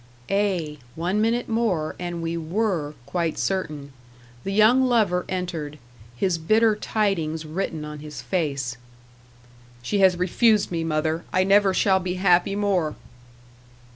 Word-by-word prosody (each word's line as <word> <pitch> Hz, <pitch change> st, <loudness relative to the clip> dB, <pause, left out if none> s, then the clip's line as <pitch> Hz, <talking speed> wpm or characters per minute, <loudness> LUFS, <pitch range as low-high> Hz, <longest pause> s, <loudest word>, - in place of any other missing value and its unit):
Ay! 185 Hz, -7 st, 0 dB, 0.2 s
one 180 Hz, +6 st, 0 dB
minute 230 Hz, +2 st, +1 dB
more, 215 Hz, -9 st, 0 dB
and 175 Hz, -1 st, -4 dB
we 165 Hz, 0 st, -2 dB
WERE 165 Hz, -2 st, -1 dB
quite 170 Hz, 0 st, -2 dB
certain. 150 Hz, -7 st, -3 dB, 0.5 s
The 195 Hz, -, -3 dB
young 215 Hz, +6 st, +5 dB
lover 215 Hz, -8 st, +2 dB
entered 170 Hz, -5 st, -4 dB, 0.4 s
his 170 Hz, +5 st, 0 dB
bitter 215 Hz, +6 st, +3 dB
tidings 175 Hz, -8 st, -1 dB
written 155 Hz, -1 st, -3 dB
on 150 Hz, 0 st, -7 dB
his 150 Hz, -2 st, -8 dB
face. 135 Hz, -3 st, -2 dB, 1.1 s
"She 200 Hz, +11 st, -1 dB
has 190 Hz, -2 st, +5 dB
refused 205 Hz, +4 st, +2 dB
me, 165 Hz, -2 st, -1 dB
mother. 160 Hz, +1 st, -1 dB
I 185 Hz, -, +3 dB
never 195 Hz, 0 st, +4 dB
shall 190 Hz, 0 st, +3 dB
be 180 Hz, 0 st, -3 dB
happy 185 Hz, +1 st, +3 dB
more." 195 Hz, -7 st, 0 dB
180 Hz, 135 wpm, -24 LUFS, 155-200 Hz, 1.1 s, young